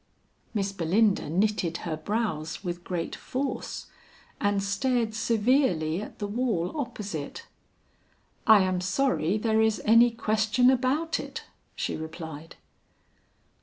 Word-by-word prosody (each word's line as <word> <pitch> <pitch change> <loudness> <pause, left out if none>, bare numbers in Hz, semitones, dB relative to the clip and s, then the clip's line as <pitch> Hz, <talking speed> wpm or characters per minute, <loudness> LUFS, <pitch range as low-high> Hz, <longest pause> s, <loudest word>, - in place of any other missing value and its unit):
Miss 200 -1 0
Belinda 195 +1 +2
knitted 185 -1 +1
her 165 -2 -2
brows 195 -5 -2
with 175 -1 -4
great 175 -2 -3
force, 270 +1 -4 0.5
and 205 -1 +1
stared 230 +3 0
severely 220 - +2
at - - -9
the 205 - -3
wall 205 - -1
opposite. 210 - -5 1.0
"I 220 -3 +8
am 185 -1 0
sorry 190 - +1
there 220 0 +2
is 220 -1 +2
any 230 +2 +7
question 225 +2 +2
about 275 +6 +1
it," - - -6 0.3
she - - -2
replied. 160 0 -8
210 Hz, 115 wpm, -27 LUFS, 175-235 Hz, 1.0 s, I